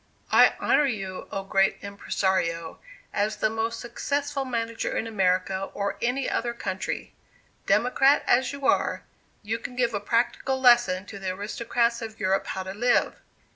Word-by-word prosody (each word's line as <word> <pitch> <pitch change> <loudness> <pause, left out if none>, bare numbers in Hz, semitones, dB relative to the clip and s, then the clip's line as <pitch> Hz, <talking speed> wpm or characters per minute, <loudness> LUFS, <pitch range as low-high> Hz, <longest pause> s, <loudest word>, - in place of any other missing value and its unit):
"I - - +6
honor 295 - +3
you, 195 -6 -4
oh! 195 - -3
Great 195 0 +2
Impressario, 185 -4 -1 0.3
as 210 +1 0
the 215 +1 +1
most 225 +1 -2
successful 280 +3 -2
manager 230 -2 -2
in - - -1
America 190 -2 0
or 200 0 -2
any 250 +3 0
other 235 0 -1
country. 190 -4 -4 0.5
Democrat, 270 +3 +4
as 260 +2 +3
you 280 -1 -6
are, 285 - +1 0.4
you 220 +2 -2
can 250 - -7
give 240 -2 +1
a 205 - -1
practical 240 +5 0
lesson 240 -7 +4
to 200 -1 -9
the 190 -1 -3
aristocrats 235 +4 -1
of 225 -1 -7
Europe 190 +1 0
how 190 - -3
to 190 0 -6
live. 240 +4 +1
225 Hz, 155 wpm, -26 LUFS, 195-245 Hz, 0.5 s, I